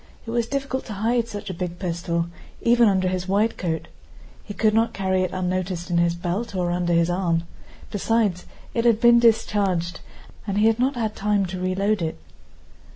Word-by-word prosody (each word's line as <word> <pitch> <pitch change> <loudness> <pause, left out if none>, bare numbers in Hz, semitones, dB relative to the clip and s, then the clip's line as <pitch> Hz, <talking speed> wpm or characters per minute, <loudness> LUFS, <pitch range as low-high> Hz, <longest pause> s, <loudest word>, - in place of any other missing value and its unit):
It 225 - -5
was 235 -1 0
difficult 275 0 -3
to 220 - -6
hide 230 +3 0
such 205 -3 -6
a - - -5
big 175 0 -4
pistol 170 -2 -2 0.4
even 235 -1 +5
under 190 -2 +1
his 185 0 -2
wide 205 +4 +2
coat. 165 -3 -3 0.6
He 205 - -8
could 215 -1 +2
not 225 +1 +2
carry 190 -1 +1
it 185 -1 -1
unnoticed 185 -1 -2
in 170 - +3
his 170 0 +2
belt 190 +5 -3
or 175 -1 0
under 175 0 0
his 170 +1 +3
arm. 170 -2 0 0.5
Besides, 205 -3 0 0.3
it 230 - 0
had 230 -2 +4
been 235 0 +6
discharged, 200 -6 +2 0.5
and 200 0 -1
he 210 - +4
had 225 +1 +3
not 260 +2 +1
had 220 -3 -2
time 205 -1 +1
to 185 0 -5
reload 195 +2 0
it. 160 -1 -2
195 Hz, 190 wpm, -23 LUFS, 175-225 Hz, 0.6 s, been